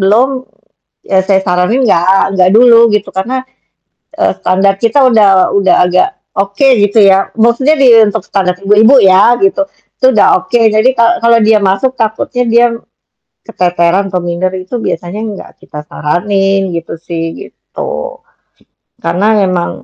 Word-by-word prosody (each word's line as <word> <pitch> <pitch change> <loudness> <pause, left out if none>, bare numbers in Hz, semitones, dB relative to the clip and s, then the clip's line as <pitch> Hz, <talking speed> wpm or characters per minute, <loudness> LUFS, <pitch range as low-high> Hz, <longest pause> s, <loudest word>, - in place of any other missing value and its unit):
belum, 215 +7 +2 0.8
ya 190 - +2
saya 195 -1 +1
saranin 180 +7 0
nggak 195 +1 +1
nggak 180 0 +3
dulu 240 0 +5 0.2
gitu 210 -1 -2
karena, 195 +7 -3 0.8
eee, - - +1
standar 195 +2 +1
kita 230 +4 +1
udah 200 -5 +2
udah 195 - +2
agak 180 - +1 0.3
oke 200 +7 -1 0.2
gitu 205 +2 +1
ya. 195 0 +2
Maksudnya 235 +6 +2
di 275 - +3 0.2
untuk 205 - -3
standar 185 -2 -2
ibu-ibu 210 +6 +3
ya 195 +5 +4
gitu. 380 -6 +1 0.4
Itu - - +1
udah 210 - +3 0.2
oke 185 +6 -1 0.2
jadi 215 +4 +2
kalau 235 0 +3
kalau 230 0 +3
dia 220 -1 +3
masuk 195 +7 0
takutnya 225 +2 -2
dia 235 +1 +4
m - - -6 0.7
keteteran 180 +2 -1
atau 180 - -1
minder 175 +2 -3
itu 185 +6 -6
biasanya 175 -2 -5
nggak 210 -3 -8
kita 150 - -10
saranin 195 +4 -1
gitu 170 0 -6
sih 165 -1 -6 0.3
gitu. - - -8 0.8
Karena 190 +4 -2 0.2
memang 180 -2 -2
200 Hz, 150 wpm, -10 LUFS, 185-230 Hz, 0.8 s, dulu